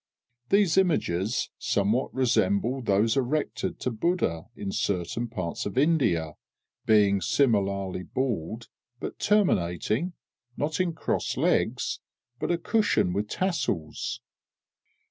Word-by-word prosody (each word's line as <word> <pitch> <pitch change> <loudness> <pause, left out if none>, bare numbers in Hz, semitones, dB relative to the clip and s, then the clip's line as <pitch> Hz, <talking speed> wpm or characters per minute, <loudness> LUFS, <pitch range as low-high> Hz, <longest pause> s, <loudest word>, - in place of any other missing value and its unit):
These 195 -3 +4
images 110 - 0
somewhat 105 +5 +1
resemble 130 +3 +1
those 110 0 +2
erected 140 +3 -1
to 125 - -1
Buddha 110 - 0
in 95 - -4
certain 100 +6 -1
parts 95 -7 -4
of 100 - -7
India, 130 - +2 0.5
being 100 -3 +4
similarly 100 -6 +1
bald, 115 -1 -3 0.3
but - - -6
terminating 165 - +1 0.4
not 155 +4 -1
in 180 -2 +1
crossed 160 - -2
legs, - - +1 0.4
but - - -2
a 175 - +2
cushion 205 - +1
with 100 +2 -1
tassels. 165 - -2
115 Hz, 105 wpm, -27 LUFS, 95-160 Hz, 0.5 s, These